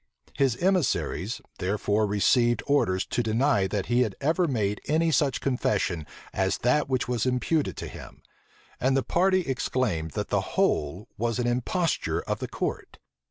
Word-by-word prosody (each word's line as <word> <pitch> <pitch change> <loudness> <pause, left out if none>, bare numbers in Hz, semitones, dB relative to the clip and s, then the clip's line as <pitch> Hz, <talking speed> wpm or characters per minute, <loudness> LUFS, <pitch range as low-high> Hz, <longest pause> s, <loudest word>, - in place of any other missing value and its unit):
His 135 -4 +2
emissaries, 180 -1 0 0.2
therefore 105 +2 0
received 120 +3 +2
orders 95 -10 +2
to - - -1
deny 110 -2 +2
that 100 0 -2
he 120 +1 +2
had 110 -6 0
ever 165 +5 +1
made 105 -7 -1
any 160 +2 +2
such 140 -1 +1
confession 100 - 0 0.3
as 95 0 +1
that 140 +4 +2
which 130 -2 0
was 125 0 0
imputed 135 +5 0
to - - -5
him; - - -11 0.6
and 130 +1 +2
the 135 - +1
party 185 +2 +2
exclaimed 130 - -1
that - - -2
the - - +2 0.2
whole 85 +9 +1
was 115 +1 0
an 125 - 0
imposture 125 +8 0
of - - -3
the - - -4
court. - - -4
125 Hz, 160 wpm, -26 LUFS, 105-140 Hz, 0.6 s, His